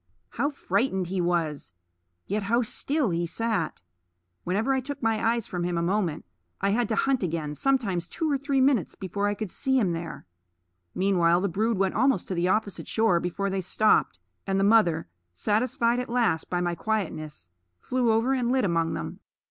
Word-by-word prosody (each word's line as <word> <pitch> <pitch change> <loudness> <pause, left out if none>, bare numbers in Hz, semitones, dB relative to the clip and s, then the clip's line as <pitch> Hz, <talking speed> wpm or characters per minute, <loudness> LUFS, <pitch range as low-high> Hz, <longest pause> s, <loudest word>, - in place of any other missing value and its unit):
How 285 - -1
frightened 210 - -1
he 185 -1 -1
was! 165 - -1 0.5
Yet 210 +2 -1
how 235 +5 +1
still 275 - 0
he 170 0 -1
sat! 210 - -2 0.6
Whenever 210 +9 0
I 265 - +1
took 280 0 -7
my 225 -1 +1
eyes 230 -1 +1
from 175 -1 -4
him 175 -1 -1
a 170 - 0
moment 180 - -1 0.3
I 200 +1 +1
had 235 +1 +1
to 220 - +1
hunt 270 +4 +1
again, 160 -4 -2
sometimes 195 - 0
two 320 - -3
or 290 - +2
three 280 -1 +1
minutes, 260 - +2
before 200 +2 -2
I 205 - 0
could 205 -3 -5
see 265 -1 +1
him 195 -7 +1
there. 165 0 -6 0.7
Meanwhile 180 -2 +3
the 200 - 0
brood 220 +5 0
went 190 0 +1
almost 255 -4 +2
to - - -1
the 175 0 0
opposite 205 +1 -1
shore 220 -6 +2
before 195 +3 -2
they 190 0 -1
stopped, 200 - +2 0.3
and 195 0 +1
the - - +2
mother, 200 - +3 0.3
satisfied 235 - +1
at 250 - -4
last 235 -9 +1
by 175 -1 0
my 175 -1 0
quietness, 155 - -4 0.3
flew 250 - +1
over 225 +4 +2
and 245 -2 0
lit 260 -3 +2
among 165 -2 0
them. 165 - -6
200 Hz, 190 wpm, -26 LUFS, 175-235 Hz, 0.7 s, Meanwhile